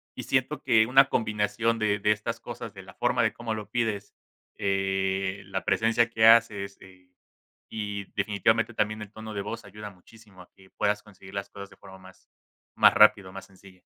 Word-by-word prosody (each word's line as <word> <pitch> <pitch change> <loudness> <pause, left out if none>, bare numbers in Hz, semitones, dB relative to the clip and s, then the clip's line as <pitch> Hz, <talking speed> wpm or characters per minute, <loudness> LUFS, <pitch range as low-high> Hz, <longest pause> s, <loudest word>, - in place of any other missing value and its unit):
y - - -6
siento 130 +3 -1
que 110 -1 +4
una 135 +3 +6
combinación 110 0 -1
de 105 -1 0
de 105 +1 +2
estas 115 +2 -3
cosas, - - -8
de - - -11
la - - -14
forma - - +1
de - - +2
cómo 115 -1 -5
lo 105 -1 -7
pides, 110 -3 -2 0.4
eh, 95 0 -1
la 95 0 -4
presencia 115 +1 +2
que 110 -1 +3
haces, 105 -4 +4
eh, 95 -1 -17 0.7
y 105 -2 -4
definitivamente 110 +3 0
también 105 0 -1
el 105 - -9
tono 110 0 -9
de 100 - -4
voz 115 - -6
ayuda 105 +1 -9
muchísimo 100 +1 -18
a 90 - -21
que 95 0 -20
puedas 105 0 0
conseguir 95 -2 -15
las 100 0 -4
cosas 100 0 -10
de - - -17
forma 95 - -14
más 95 0 -18 0.5
más - - +6
rápida, 100 -3 +5
o - - -15
más 95 0 -9
sencilla. 95 -1 -19
105 Hz, 195 wpm, -26 LUFS, 95-110 Hz, 0.7 s, una